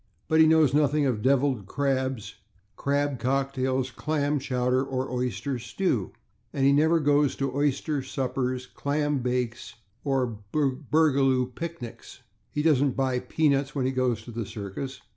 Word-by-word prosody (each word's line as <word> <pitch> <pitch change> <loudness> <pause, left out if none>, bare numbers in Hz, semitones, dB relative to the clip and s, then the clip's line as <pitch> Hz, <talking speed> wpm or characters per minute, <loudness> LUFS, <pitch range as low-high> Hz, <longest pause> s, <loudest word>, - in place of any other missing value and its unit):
But 160 0 +3
he 160 - +8
knows 155 -4 +4
nothing 150 0 +3
of 120 -6 0
/devilled 130 -5 +2
crabs/, 130 -6 -1 0.4
/crab 140 -2 0
cocktails/, 130 0 0
/clam 145 0 -1
chowder/ 125 -1 +1
or 130 -1 -2
/oyster 125 +1 -2
stews/, 120 - -1 0.4
and 135 -1 0
he 140 - +6
never 160 +4 +4
goes 145 -1 +3
to 135 -1 -2
/oyster 145 +1 0
suppers/, 130 -1 -2
/clam 145 -1 0
bakes/ 125 -1 -2 0.3
or 130 -6 -1
/burgoo 135 -2 +2
picnics/. 165 -6 -8 0.3
He 150 - -2
doesn't 145 -4 +3
buy 130 -2 +1
/peanuts/ 145 0 +1
when 135 -3 0
he 130 - +1
goes 125 -4 0
to 120 - -9
the 115 -2 -4
circus. 105 +6 -6
135 Hz, 140 wpm, -26 LUFS, 125-145 Hz, 0.4 s, he